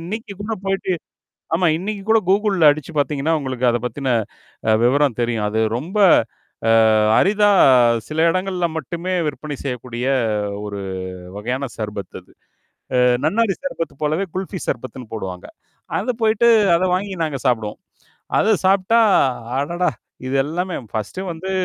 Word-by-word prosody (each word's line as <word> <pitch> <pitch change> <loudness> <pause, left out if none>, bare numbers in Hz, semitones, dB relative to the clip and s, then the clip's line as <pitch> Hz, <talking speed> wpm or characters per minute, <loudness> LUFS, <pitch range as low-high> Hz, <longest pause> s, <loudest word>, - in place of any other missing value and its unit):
இன்னைக்கு 210 +5 -6
கூட 215 +2 -4
போயிட்டு. 195 -1 -1 0.6
ஆமா. 175 +1 +3
இன்னைக்கு 200 +2 -4
கூட 225 0 +6
கூகுள்ல 195 -6 +4
அடிச்சு 155 +2 -6
பார்த்தீங்கன்னா, 145 +2 0
உங்களுக்கு 130 -2 -3
அத 120 - +1
பத்தின 130 +1 -1 0.6
அ - - +5
விவரம் 135 -1 +2
தெரியும். 115 -3 -1
அது 110 +1 -1 0.2
ரொம்ப 175 - -5 0.9
அ - - +4 0.3
அரிதா 205 +2 +3 0.6
சில 160 +2 +1
இடங்கள்ல 185 -2 -1
மட்டுமே 170 +5 -4
விற்பனை 145 0 -5
செய்யக்கூடிய 125 -2 -4 0.6
ஒரு 100 -1 -5 0.6
வகையான 125 +6 -3
சார்பத் 105 -4 -6
அது. - - -24 0.6
அ - - +3 0.3
நன்னாரி 210 +2 +2
சர்பத்து 255 - -4
போலவே 160 +6 0
குல்ஃபி 190 -1 -4
சர்பத்துன்னு 125 -1 -5
போடுவாங்க. 95 -4 -6 0.5
அத 250 - -2
போயிட்டு 220 +1 +3 0.3
அத 185 - 0
வாங்கி 195 +1 -2
நாங்க 145 -4 -3
சாப்பிடுவோம். 110 -4 -1 0.6
அத 210 - +2 0.2
சாப்ட்டா, 195 +4 +3 0.6
அடடா! 170 +6 0 0.4
இது 130 - -3
எல்லாமே 175 +5 -3 0.2
ஃபர்ஸ்ட்டு 110 - -4
வந்து 170 +3 -5
160 Hz, 135 wpm, -20 LUFS, 125-190 Hz, 0.9 s, கூட